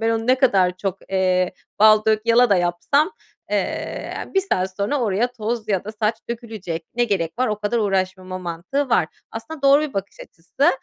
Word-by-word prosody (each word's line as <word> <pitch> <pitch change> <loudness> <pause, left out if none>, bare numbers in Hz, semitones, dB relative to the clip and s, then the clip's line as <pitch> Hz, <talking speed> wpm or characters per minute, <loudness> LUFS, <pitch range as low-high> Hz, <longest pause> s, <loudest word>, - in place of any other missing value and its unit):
"Ben 225 0 +1
onu 225 0 -1
ne 255 - +5
kadar 195 -9 +3
çok, 195 0 -3
eee, 185 -1 +2 0.3
bal 215 0 +6
dök 215 -1 +2
yala 235 0 +5
da 200 - +5
yapsam, 180 - +1 0.4
eee, - - -2
ya - - -8
1 385 - +5
saat 190 - -2
sonra 210 +8 0
oraya 230 +2 0
toz 225 -1 -4
ya 190 -3 0
da 215 - -6
saç 215 +1 0
dökülecek. 215 -8 -5
Ne 240 0 +2
gerek 190 -3 -2
var 255 -2 +2
o 210 - -2
kadar 210 +3 -1
uğraşmama?" 185 -2 -1
mantığı 185 +11 -3
var. 180 -9 +3 0.2
Aslında 280 +6 -8
doğru 275 +2 +6
bir 305 -3 -4
bakış 195 +1 -5
açısı. 170 - -1
215 Hz, 195 wpm, -22 LUFS, 185-240 Hz, 0.4 s, bal